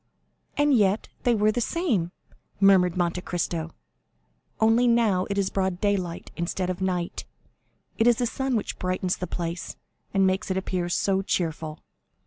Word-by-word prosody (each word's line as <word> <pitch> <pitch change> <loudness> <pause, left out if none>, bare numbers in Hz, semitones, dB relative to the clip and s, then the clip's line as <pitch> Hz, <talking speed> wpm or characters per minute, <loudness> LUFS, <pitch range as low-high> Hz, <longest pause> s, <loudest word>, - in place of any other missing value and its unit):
"And 290 0 +4
yet 205 -3 +2
they 240 -1 +3
were 210 0 +3
the 240 - -1
same," 230 - 0 0.5
murmured 185 -3 +5
Monte 175 0 0
Cristo, 170 -2 -2 0.9
"only 225 +2 +4
now 220 -6 +3
it 200 - -2
is 195 -1 +1
broad 190 -2 -1
daylight 190 -5 -1
instead 180 +2 -2
of 180 +1 -6
night; 180 -2 -2 0.8
it 225 - +4
is 240 - +6
the 245 - 0
sun 265 +2 -1
which 220 - -3
brightens 185 0 -1
the 180 - -4
place, 170 0 -4 0.4
and 195 -1 +3
makes 190 +2 0
it 190 - 0
appear 185 -2 -2
so 190 +2 +1
cheerful." 160 -4 -2
190 Hz, 155 wpm, -26 LUFS, 180-215 Hz, 0.9 s, is